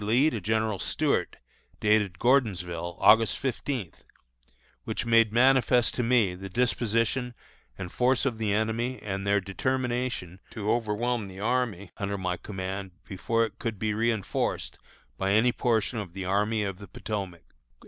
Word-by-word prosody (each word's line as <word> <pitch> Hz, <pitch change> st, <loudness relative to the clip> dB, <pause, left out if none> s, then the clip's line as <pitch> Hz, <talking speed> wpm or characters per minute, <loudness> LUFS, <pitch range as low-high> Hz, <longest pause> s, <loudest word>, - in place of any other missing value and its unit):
Lee 125 Hz, +9 st, +3 dB
to 110 Hz, -, -4 dB
General 110 Hz, 0 st, 0 dB
Stuart, -, -, 0 dB, 0.4 s
dated 105 Hz, -4 st, +2 dB
Gordonsville, 90 Hz, -9 st, +1 dB
August 110 Hz, +1 st, +5 dB
fifteenth, 130 Hz, -, -4 dB, 0.8 s
which -, -, -3 dB
made 115 Hz, -2 st, +4 dB
manifest 125 Hz, 0 st, +4 dB
to -, -, -1 dB
me 115 Hz, -6 st, +3 dB
the 95 Hz, +2 st, -8 dB
disposition 120 Hz, +2 st, 0 dB, 0.4 s
and 90 Hz, -2 st, -6 dB
force 125 Hz, +1 st, +2 dB
of 120 Hz, -5 st, -1 dB
the 110 Hz, -2 st, 0 dB
enemy 110 Hz, +4 st, -1 dB
and 100 Hz, -1 st, -3 dB
their 100 Hz, 0 st, +4 dB
determination 120 Hz, -2 st, -2 dB
to 105 Hz, -1 st, -2 dB
overwhelm 115 Hz, 0 st, 0 dB
the 95 Hz, 0 st, -10 dB
army 110 Hz, -4 st, -1 dB
under 100 Hz, 0 st, -2 dB
my 90 Hz, -1 st, -1 dB
command 95 Hz, 0 st, -5 dB
before 115 Hz, +4 st, 0 dB
it 105 Hz, -2 st, -10 dB
could 115 Hz, -3 st, -3 dB
be 110 Hz, +2 st, -1 dB
reënforced 110 Hz, -1 st, -1 dB, 0.4 s
by 95 Hz, +1 st, +1 dB
any 115 Hz, +4 st, +4 dB
portion 115 Hz, -2 st, 0 dB
of 95 Hz, -5 st, -7 dB
the 95 Hz, -1 st, -5 dB
Army 105 Hz, +3 st, +1 dB
of 95 Hz, -2 st, -4 dB
the 100 Hz, -, -10 dB
Potomac." 95 Hz, -6 st, -5 dB
110 Hz, 150 wpm, -27 LUFS, 95-120 Hz, 0.8 s, August